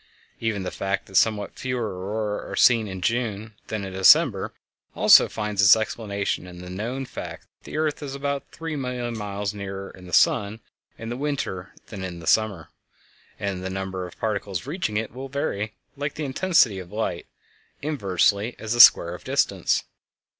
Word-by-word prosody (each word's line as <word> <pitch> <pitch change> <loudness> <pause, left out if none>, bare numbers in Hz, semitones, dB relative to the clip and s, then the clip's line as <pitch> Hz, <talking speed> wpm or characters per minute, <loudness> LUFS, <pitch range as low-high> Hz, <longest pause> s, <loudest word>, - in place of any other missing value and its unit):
Even 110 -4 -1
the 90 - -4
fact 100 0 -2
that 95 - -13
somewhat 105 -1 +2
fewer 125 -4 -2
auroræ 105 +3 -4
are - - -3
seen 115 -3 +5
in 95 -1 -6
June 110 -1 -1
than 105 -3 -3
in 95 - -7
December 95 0 +5 0.4
also - - +7
finds 105 -2 -1
its 95 - +8
explanation 100 -4 -3
in 90 -1 -11
the 90 0 -9
known 120 +8 -4
fact - - -8
that - - -34
the - - -6
earth 155 -1 -1
is 140 -2 -5
about 140 0 -3
three 165 -1 -5
million 125 -3 -3
miles 105 -1 -3
nearer 100 -1 -6
the 90 -1 -12
sun 100 +5 +3 0.4
in 115 - -7
the 120 - -3
winter 130 -10 -3 0.2
than 100 -4 -7
in 90 -2 -5
the 85 - -10
summer, 100 -4 +1 0.7
and 95 -2 -3
the 95 - -3
number 95 -1 -4
of 90 - -15
particles 100 -2 -3
reaching 145 - -2
it 110 0 -3
will 135 +2 -7
vary, 110 -7 -3 0.2
like 145 +1 -4
the 155 - -3
intensity 135 - +3
of 90 0 -10
light, 105 -5 -3 0.6
inversely 105 - +1
as 110 0 -3
the 120 - -2
square 85 -6 +8
of 90 - -9
the - - -6
distance. - - +1
105 Hz, 180 wpm, -24 LUFS, 95-125 Hz, 0.7 s, its